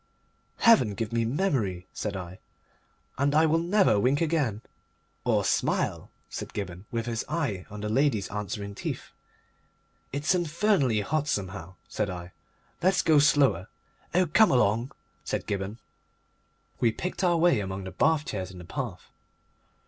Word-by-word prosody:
"Heaven 165 Hz, -, +5 dB
give 115 Hz, +2 st, -3 dB
me 115 Hz, -1 st, +1 dB
memory," 115 Hz, -, 0 dB
said 105 Hz, -2 st, -3 dB
I, 90 Hz, 0 st, -8 dB, 0.8 s
"and 140 Hz, +1 st, +2 dB
I 160 Hz, +1 st, +6 dB
will 160 Hz, +1 st, +3 dB
never 175 Hz, -, +3 dB
wink 130 Hz, +6 st, +2 dB
again." 150 Hz, -10 st, 0 dB, 0.6 s
"Or -, -, +2 dB
smile," -, -, 0 dB, 0.2 s
said -, -, -7 dB
Gibberne, 95 Hz, -1 st, -5 dB
with 115 Hz, -1 st, -2 dB
his 115 Hz, -2 st, -2 dB
eye 140 Hz, -, -2 dB
on 105 Hz, 0 st, -8 dB
the 105 Hz, -, -2 dB
lady's 110 Hz, -3 st, +1 dB
answering 105 Hz, 0 st, -4 dB
teeth. -, -, -5 dB, 1.0 s
"It's 145 Hz, +6 st, +1 dB
infernally 170 Hz, -, +2 dB
hot, 150 Hz, +7 st, -1 dB
somehow," 95 Hz, -, -3 dB
said 105 Hz, -2 st, -2 dB
I. 90 Hz, -1 st, -7 dB, 0.5 s
"Let's 185 Hz, +1 st, +3 dB
go 155 Hz, -2 st, +5 dB
slower." 140 Hz, -, +3 dB, 0.5 s
"Oh, 185 Hz, 0 st, +5 dB
come 200 Hz, +7 st, +5 dB
along!" 120 Hz, 0 st, +2 dB, 0.3 s
said -, -, -3 dB
Gibberne. 100 Hz, +2 st, -3 dB, 1.0 s
We 115 Hz, -, +3 dB
picked 180 Hz, -, -4 dB
our 175 Hz, -2 st, +3 dB
way 165 Hz, -7 st, +4 dB
among 95 Hz, -1 st, -4 dB
the 95 Hz, -, -6 dB
bath 150 Hz, -, +2 dB
chairs 95 Hz, -3 st, -4 dB
in 95 Hz, -, -11 dB
the 90 Hz, -, -10 dB
path. 85 Hz, -, -6 dB
115 Hz, 150 wpm, -27 LUFS, 100-155 Hz, 1.0 s, I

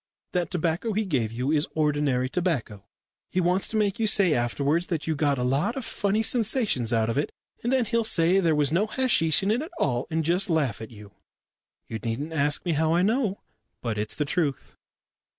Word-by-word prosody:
That 175 Hz, -2 st, -1 dB
tobacco 175 Hz, +6 st, -1 dB
he 215 Hz, +2 st, 0 dB
gave 125 Hz, -, -1 dB
you 125 Hz, +5 st, -2 dB
is 150 Hz, -1 st, +1 dB
ordinary 145 Hz, -4 st, +1 dB
tobacco. 130 Hz, -, -2 dB, 0.4 s
He 185 Hz, -, -1 dB
wants 180 Hz, +2 st, +1 dB
to 220 Hz, -, -3 dB
make 205 Hz, -1 st, 0 dB
you 220 Hz, -, +2 dB
say 195 Hz, -5 st, +3 dB
afterwards 140 Hz, +7 st, 0 dB
that 165 Hz, -4 st, -3 dB
you 160 Hz, -, -1 dB
got 145 Hz, -1 st, +1 dB
a 125 Hz, -, -2 dB
lot 135 Hz, -, 0 dB
of 265 Hz, -3 st, -4 dB
funny 205 Hz, +2 st, 0 dB
sensations 220 Hz, -, +2 dB
out 115 Hz, -2 st, +1 dB
of 115 Hz, +5 st, 0 dB
it, 145 Hz, -, -2 dB, 0.3 s
and 240 Hz, -, -1 dB
then 260 Hz, -3 st, +2 dB
he'll 230 Hz, +1 st, 0 dB
say 180 Hz, -2 st, +4 dB
there 165 Hz, -4 st, +2 dB
was 145 Hz, -1 st, +2 dB
no 190 Hz, +7 st, +1 dB
hasheesh 215 Hz, -, +2 dB
in 200 Hz, -, +1 dB
it 235 Hz, +4 st, +1 dB
at 315 Hz, -, -6 dB
all, 125 Hz, -, -1 dB
and 160 Hz, -1 st, -1 dB
just 180 Hz, +4 st, +1 dB
laugh 140 Hz, -11 st, 0 dB
at 110 Hz, -, -7 dB
you. 105 Hz, -3 st, -13 dB, 0.8 s
You 110 Hz, -, -5 dB
needn't 125 Hz, +8 st, -4 dB
ask 145 Hz, +1 st, +1 dB
me 175 Hz, -, 0 dB
how 160 Hz, +1 st, +1 dB
I 175 Hz, -, +2 dB
know, 215 Hz, -1 st, 0 dB, 0.4 s
but 110 Hz, -3 st, -2 dB
it's 105 Hz, +1 st, -2 dB
the 150 Hz, -, -1 dB
truth." 145 Hz, -3 st, -2 dB
160 Hz, 210 wpm, -25 LUFS, 135-195 Hz, 0.8 s, say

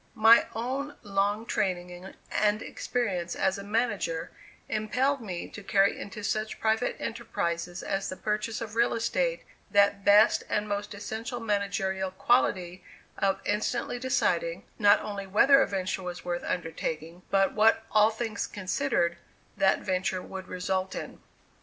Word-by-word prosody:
My 225 Hz, +2 st, +7 dB
own 270 Hz, +5 st, -3 dB
long 205 Hz, +2 st, 0 dB
training 180 Hz, -2 st, -3 dB, 0.2 s
and 210 Hz, 0 st, +2 dB
experience 185 Hz, -9 st, -2 dB
as 190 Hz, +1 st, 0 dB
a -, -, -7 dB
manager 205 Hz, -6 st, -1 dB, 0.4 s
impelled 250 Hz, +6 st, 0 dB
me 185 Hz, -6 st, -5 dB
to 205 Hz, -, -9 dB
carry 195 Hz, 0 st, +3 dB
into 205 Hz, +1 st, -7 dB
such 215 Hz, +1 st, -2 dB
private 220 Hz, +2 st, +1 dB
enterprises 175 Hz, -6 st, -3 dB
as 195 Hz, 0 st, -2 dB
the 185 Hz, -, -5 dB
purchase 210 Hz, +1 st, -2 dB
of 215 Hz, -2 st, -5 dB
real 235 Hz, 0 st, +3 dB
estate -, -, 0 dB, 0.3 s
that 200 Hz, -1 st, +3 dB
best 210 Hz, +2 st, +6 dB
and 210 Hz, 0 st, 0 dB
most 205 Hz, 0 st, -3 dB
essential 225 Hz, +4 st, -5 dB
managerial 200 Hz, -3 st, -1 dB
quality 185 Hz, -3 st, +1 dB, 0.3 s
of 195 Hz, -1 st, 0 dB
instantly 235 Hz, +4 st, -1 dB
deciding, -, -, 0 dB, 0.2 s
not 205 Hz, -1 st, +6 dB
only 200 Hz, -2 st, -5 dB
whether 275 Hz, +8 st, +6 dB
a -, -, +2 dB
venture 190 Hz, -1 st, -2 dB
was 180 Hz, -1 st, -6 dB
worth 175 Hz, 0 st, -2 dB
undertaking, 165 Hz, 0 st, -4 dB
but 195 Hz, -1 st, +3 dB
what, 220 Hz, +1 st, +4 dB
all 215 Hz, 0 st, +5 dB
things 220 Hz, -2 st, -3 dB
considered, 185 Hz, -3 st, 0 dB, 0.4 s
that 190 Hz, -, +3 dB
venture 185 Hz, 0 st, -1 dB
would 190 Hz, -1 st, -8 dB
result 185 Hz, +1 st, -2 dB
in. -, -, -7 dB
205 Hz, 140 wpm, -28 LUFS, 190-225 Hz, 0.4 s, My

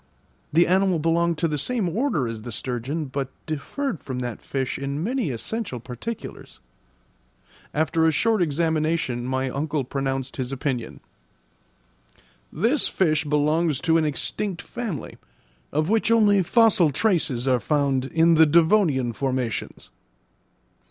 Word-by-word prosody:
The 170 Hz, +3 st, +5 dB
animal 185 Hz, 0 st, +2 dB
belonged 165 Hz, +1 st, +1 dB
to 165 Hz, -, +1 dB
the 150 Hz, -2 st, -2 dB
same 235 Hz, -, -1 dB
order 175 Hz, -, 0 dB
as 115 Hz, -1 st, -5 dB
the 120 Hz, -, -7 dB
sturgeon, 130 Hz, +7 st, -3 dB
but 135 Hz, -1 st, -4 dB, 0.2 s
differed 175 Hz, -, -3 dB
from 130 Hz, -2 st, -5 dB
that 120 Hz, -3 st, -4 dB
fish 130 Hz, -2 st, -3 dB
in 140 Hz, +3 st, -3 dB
many 245 Hz, -, -1 dB
essential 130 Hz, -, -4 dB
particulars. 125 Hz, -, -8 dB, 1.1 s
After 160 Hz, +1 st, +1 dB
a -, -, +4 dB
short 220 Hz, +6 st, +1 dB
examination 155 Hz, -5 st, 0 dB
my 130 Hz, 0 st, -1 dB
uncle 145 Hz, +1 st, -2 dB
pronounced 135 Hz, 0 st, -3 dB
his 130 Hz, -1 st, -3 dB
opinion. 130 Hz, -3 st, -3 dB, 1.5 s
"This 230 Hz, -, +1 dB
fish 155 Hz, -4 st, +1 dB
belongs 150 Hz, 0 st, +1 dB
to 165 Hz, -1 st, +3 dB
an 155 Hz, -, +1 dB
extinct 175 Hz, +5 st, -3 dB
family, 215 Hz, -, -6 dB, 0.5 s
of 155 Hz, +2 st, 0 dB
which 225 Hz, +3 st, +2 dB
only 210 Hz, -3 st, +5 dB
fossil 215 Hz, -3 st, +4 dB
traces 145 Hz, -, +1 dB
are 130 Hz, -2 st, +3 dB
found 140 Hz, -2 st, +1 dB
in 165 Hz, +4 st, +3 dB
the 160 Hz, 0 st, +6 dB
devonian 160 Hz, -, +3 dB
formations." 130 Hz, -3 st, -3 dB
155 Hz, 130 wpm, -24 LUFS, 130-175 Hz, 1.5 s, the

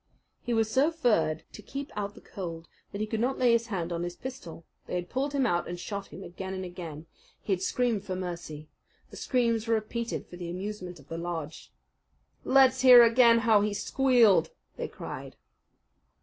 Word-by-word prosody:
He 240 Hz, -, -4 dB
was 225 Hz, -2 st, +2 dB
so 270 Hz, +7 st, +3 dB
furred 210 Hz, -, +1 dB
to -, -, -10 dB
keep 275 Hz, +1 st, -7 dB
out 205 Hz, -1 st, -4 dB
the -, -, -13 dB
cold 165 Hz, -4 st, -7 dB, 0.2 s
that 200 Hz, -, -5 dB
he -, -, +1 dB
could 215 Hz, 0 st, -3 dB
not 255 Hz, +4 st, 0 dB
lay 250 Hz, -2 st, +4 dB
his 235 Hz, 0 st, +2 dB
hand 175 Hz, -5 st, -3 dB
on 170 Hz, -, -3 dB
his 175 Hz, 0 st, -4 dB
pistol. 175 Hz, -11 st, -9 dB, 0.2 s
They -, -, -4 dB
had 175 Hz, 0 st, -4 dB
pulled 275 Hz, +3 st, -1 dB
him 275 Hz, -2 st, +2 dB
out 175 Hz, -6 st, 0 dB
and 175 Hz, 0 st, -5 dB
shot 200 Hz, +1 st, -5 dB
him 195 Hz, -, -10 dB
again 190 Hz, +2 st, -6 dB
and 185 Hz, 0 st, -4 dB
again. 165 Hz, -4 st, -8 dB, 0.3 s
He 200 Hz, -, -1 dB
had 185 Hz, -, -2 dB
screamed 230 Hz, 0 st, 0 dB
for 185 Hz, -2 st, -4 dB
mercy. 170 Hz, -4 st, -6 dB, 0.4 s
The -, -, -10 dB
screams 230 Hz, -3 st, 0 dB
were 230 Hz, -, +3 dB
repeated 230 Hz, +2 st, -3 dB
for 175 Hz, -, -12 dB
the 175 Hz, -1 st, -6 dB
amusement 185 Hz, -1 st, -6 dB
of 140 Hz, -, -18 dB
the 165 Hz, +2 st, -5 dB
lodge. 165 Hz, -3 st, -6 dB, 0.7 s
"Let's 260 Hz, -1 st, +4 dB
hear 250 Hz, -2 st, +10 dB
again 230 Hz, 0 st, +5 dB
how 220 Hz, -3 st, +5 dB
he 205 Hz, 0 st, -1 dB
squealed," 245 Hz, -, +3 dB, 0.3 s
they -, -, -4 dB
cried. -, -, -8 dB
205 Hz, 195 wpm, -28 LUFS, 175-240 Hz, 0.7 s, hear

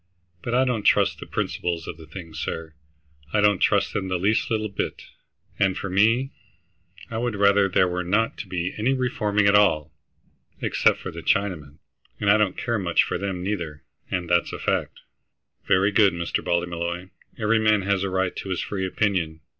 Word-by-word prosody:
But 120 Hz, -, -2 dB
I 130 Hz, +1 st, +4 dB
don't 125 Hz, -4 st, 0 dB
trust -, -, +3 dB
the -, -, -9 dB
principles 85 Hz, -2 st, -2 dB
of 80 Hz, -, -6 dB
the 80 Hz, -1 st, -13 dB
thing, 85 Hz, 0 st, -9 dB
sir; 80 Hz, +1 st, -5 dB, 0.6 s
I 105 Hz, -, +3 dB
don't 105 Hz, -1 st, +4 dB
trust -, -, +2 dB
them 95 Hz, -2 st, -2 dB
the 95 Hz, -1 st, 0 dB
least 100 Hz, +5 st, +1 dB
little 110 Hz, -1 st, 0 dB
bit, 100 Hz, -, -4 dB, 0.6 s
and 95 Hz, -2 st, +2 dB
for 100 Hz, -, -4 dB
me 115 Hz, +8 st, +3 dB, 0.8 s
I 110 Hz, -, -2 dB
would 120 Hz, -2 st, -1 dB
rather 100 Hz, -1 st, +4 dB
there 90 Hz, 0 st, +3 dB
were 90 Hz, 0 st, -2 dB
not 105 Hz, +6 st, +1 dB
to 105 Hz, -, -6 dB
be 90 Hz, 0 st, -3 dB
any 130 Hz, +5 st, +2 dB
reforming 105 Hz, -5 st, 0 dB
at 100 Hz, -, +5 dB
all, 80 Hz, -8 st, +3 dB, 0.7 s
except -, -, +2 dB
for -, -, -7 dB
the -, -, -8 dB
Chinamen, 80 Hz, -8 st, -1 dB, 0.4 s
and 100 Hz, -1 st, +3 dB
I 105 Hz, -, +6 dB
don't 105 Hz, -3 st, +1 dB
care 115 Hz, -2 st, -1 dB
much 85 Hz, -3 st, +3 dB
for -, -, -3 dB
them, 95 Hz, -3 st, -3 dB
neither, 85 Hz, -7 st, -4 dB, 0.3 s
and 90 Hz, -1 st, -2 dB
that's 85 Hz, 0 st, +2 dB
a -, -, -5 dB
fact." -, -, -2 dB, 0.7 s
"Very 95 Hz, +3 st, +3 dB
good, 100 Hz, -2 st, +4 dB
Mr. 85 Hz, 0 st, -2 dB
Ballymolloy. 85 Hz, +1 st, -2 dB, 0.3 s
Every 110 Hz, +1 st, +2 dB
man 110 Hz, -2 st, +3 dB
has 100 Hz, 0 st, +1 dB
a 100 Hz, -, -1 dB
right 95 Hz, -1 st, -1 dB
to 95 Hz, -, -6 dB
his 90 Hz, -3 st, -1 dB
free 95 Hz, -2 st, -2 dB
opinion. 90 Hz, -6 st, -1 dB
95 Hz, 190 wpm, -24 LUFS, 85-105 Hz, 0.8 s, I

